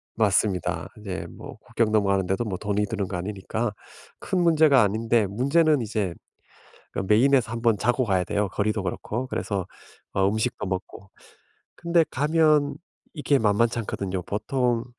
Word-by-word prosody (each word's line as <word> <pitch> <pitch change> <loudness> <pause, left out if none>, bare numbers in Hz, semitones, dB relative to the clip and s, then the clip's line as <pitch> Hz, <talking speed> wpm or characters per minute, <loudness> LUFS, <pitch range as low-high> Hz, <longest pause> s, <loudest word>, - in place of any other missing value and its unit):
맞습니다. 95 -6 +1
이제 100 -3 -6
뭐 140 -3 -11
국경 115 0 -1
넘어가는데도 100 -1 +1
뭐 100 -5 -4
돈이 105 +1 -1
드는 100 -1 -3
거 90 - -4
아니니까 105 +4 -3 0.5
큰 185 - -1
문제가 155 -5 +5
아닌데 110 +1 +1
문제는 140 - +2
이제 105 -5 -2 0.8
그러니까 95 +2 -1
메인에서 130 0 +3
1 115 - -4
번 115 -2 +3
자고 120 +4 +1
가야 95 -5 +1
돼요. 100 +2 -1
거리도 105 0 -1
그렇고. 105 +7 -3
그래서 100 -7 -3 0.5
어 95 0 +2
음식도 110 +2 -2
먹고. 95 +1 -6 0.7
근데 170 -1 +2
가면 150 0 +2 0.4
이렇게 145 -2 +1
만만치 115 +2 +2
않거든요. 95 -4 -4
보통 120 - -1
110 Hz, 330 characters per minute, -25 LUFS, 100-130 Hz, 0.8 s, 문제가